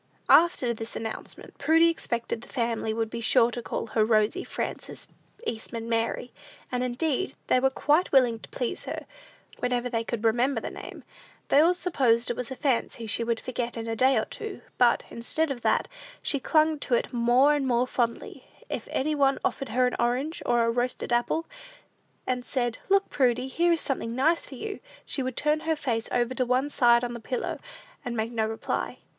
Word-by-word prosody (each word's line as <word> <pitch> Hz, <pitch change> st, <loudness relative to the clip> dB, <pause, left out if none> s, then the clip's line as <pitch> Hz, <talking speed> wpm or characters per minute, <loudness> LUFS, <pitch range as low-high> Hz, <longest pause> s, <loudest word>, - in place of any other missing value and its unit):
After 315 Hz, -8 st, +5 dB
this 225 Hz, 0 st, -6 dB
announcement, 225 Hz, -1 st, -7 dB
Prudy 325 Hz, +1 st, +5 dB
expected 235 Hz, -8 st, -2 dB
the -, -, -13 dB
family 230 Hz, -3 st, -1 dB
would 225 Hz, 0 st, -2 dB
be 235 Hz, -, -4 dB
sure 230 Hz, +1 st, +4 dB
to 240 Hz, -, -4 dB
call -, -, -3 dB
her 220 Hz, -1 st, +1 dB
Rosy 220 Hz, -, +2 dB
Frances -, -, -5 dB, 0.4 s
Eastman 230 Hz, -, -4 dB
Mary; 230 Hz, +1 st, -1 dB, 0.4 s
and, 250 Hz, 0 st, 0 dB
indeed, 280 Hz, +8 st, -1 dB
they 255 Hz, -, +3 dB
were 265 Hz, +1 st, +3 dB
quite 300 Hz, +6 st, +2 dB
willing 245 Hz, -4 st, +4 dB
to -, -, -12 dB
please 245 Hz, -, -3 dB
her, -, -, -5 dB, 0.5 s
whenever 250 Hz, 0 st, -1 dB
they 230 Hz, -2 st, 0 dB
could 230 Hz, -1 st, -4 dB
remember 240 Hz, +3 st, +2 dB
the -, -, -6 dB
name. -, -, -9 dB, 0.5 s
They 280 Hz, -, +6 dB
all 340 Hz, +4 st, +5 dB
supposed 245 Hz, -11 st, +2 dB
it -, -, -3 dB
was 250 Hz, -1 st, -5 dB
a 265 Hz, -, -5 dB
fancy 245 Hz, -4 st, -1 dB
she 220 Hz, +2 st, 0 dB
would 230 Hz, -1 st, -1 dB
forget 240 Hz, -2 st, -4 dB
in 225 Hz, -, -4 dB
a 225 Hz, 0 st, -2 dB
day 260 Hz, +4 st, +4 dB
or -, -, +1 dB
two; 435 Hz, -3 st, -7 dB, 0.2 s
but, 245 Hz, -1 st, +4 dB
instead 290 Hz, +6 st, -1 dB
of 245 Hz, -3 st, -5 dB
that, -, -, +2 dB, 0.4 s
she 280 Hz, -, +1 dB
clung 310 Hz, +2 st, +2 dB
to 255 Hz, -, +1 dB
it 235 Hz, -, -1 dB
more 245 Hz, +4 st, +4 dB
and 285 Hz, -2 st, 0 dB
more 245 Hz, 0 st, +2 dB
fondly. 240 Hz, -2 st, -2 dB, 0.2 s
If -, -, -4 dB
any 305 Hz, +3 st, 0 dB
one 275 Hz, -2 st, +3 dB
offered 275 Hz, -3 st, -2 dB
her 250 Hz, +3 st, +2 dB
an 250 Hz, -, 0 dB
orange, 255 Hz, +7 st, 0 dB
or 240 Hz, -1 st, +3 dB
roasted 245 Hz, 0 st, -1 dB
apple, 240 Hz, +7 st, +1 dB, 0.8 s
and 250 Hz, -1 st, -1 dB
said, 240 Hz, -3 st, -2 dB
"Look, 395 Hz, 0 st, +3 dB
Prudy; 250 Hz, -1 st, +2 dB
here 340 Hz, +5 st, +2 dB
is 330 Hz, -, +1 dB
something 235 Hz, -4 st, -2 dB
nice 315 Hz, +6 st, +2 dB
for 270 Hz, -, -9 dB
you," 405 Hz, -, -5 dB, 0.3 s
she 275 Hz, -, -3 dB
would 260 Hz, -1 st, -3 dB
turn 300 Hz, +1 st, +2 dB
her 320 Hz, 0 st, 0 dB
face 235 Hz, -6 st, -2 dB
over 240 Hz, +1 st, +1 dB
to 255 Hz, -, 0 dB
one 255 Hz, +4 st, +1 dB
side 240 Hz, -3 st, +4 dB
on 240 Hz, 0 st, -2 dB
the 235 Hz, -, -6 dB
pillow, 245 Hz, +2 st, -3 dB, 0.4 s
and 240 Hz, -3 st, -4 dB
make 220 Hz, +1 st, -1 dB
no 220 Hz, -2 st, 0 dB
reply. 220 Hz, 0 st, -3 dB
245 Hz, 195 wpm, -27 LUFS, 235-280 Hz, 0.8 s, They